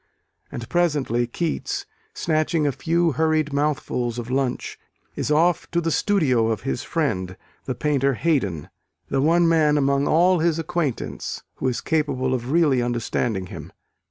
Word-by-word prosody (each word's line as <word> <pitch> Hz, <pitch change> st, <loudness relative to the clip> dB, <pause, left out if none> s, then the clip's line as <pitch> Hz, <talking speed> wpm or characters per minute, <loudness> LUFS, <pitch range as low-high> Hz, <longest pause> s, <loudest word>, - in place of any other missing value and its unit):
And 120 Hz, -, -6 dB
presently 145 Hz, -9 st, +1 dB
Keats, 175 Hz, -, -3 dB, 0.3 s
snatching 155 Hz, -, 0 dB
a 145 Hz, -, +2 dB
few 170 Hz, +4 st, +1 dB
hurried 155 Hz, 0 st, +1 dB
mouthfuls 140 Hz, -5 st, -1 dB
of 120 Hz, 0 st, -5 dB
lunch, 130 Hz, -1 st, -2 dB, 0.4 s
is -, -, -2 dB
off 165 Hz, +3 st, +2 dB
to 170 Hz, -, 0 dB
the 165 Hz, -1 st, -1 dB
studio 145 Hz, -, +2 dB
of 110 Hz, -2 st, -1 dB
his 135 Hz, -1 st, -2 dB
friend, 95 Hz, -, -2 dB, 0.3 s
the 130 Hz, -, -3 dB
painter 140 Hz, 0 st, +1 dB
Haydon 105 Hz, -, -1 dB, 0.4 s
the 135 Hz, -, +1 dB
one 170 Hz, +3 st, +4 dB
man 155 Hz, -3 st, +3 dB
among 140 Hz, 0 st, +2 dB
all 180 Hz, +2 st, +4 dB
his 165 Hz, 0 st, +2 dB
acquaintance 165 Hz, -5 st, -3 dB
who -, -, -1 dB
is 125 Hz, -, -1 dB
capable 140 Hz, -5 st, 0 dB
of 125 Hz, -1 st, -3 dB
really 150 Hz, -6 st, +3 dB
understanding 120 Hz, -4 st, -1 dB
him. -, -, -9 dB
145 Hz, 150 wpm, -23 LUFS, 125-165 Hz, 0.4 s, one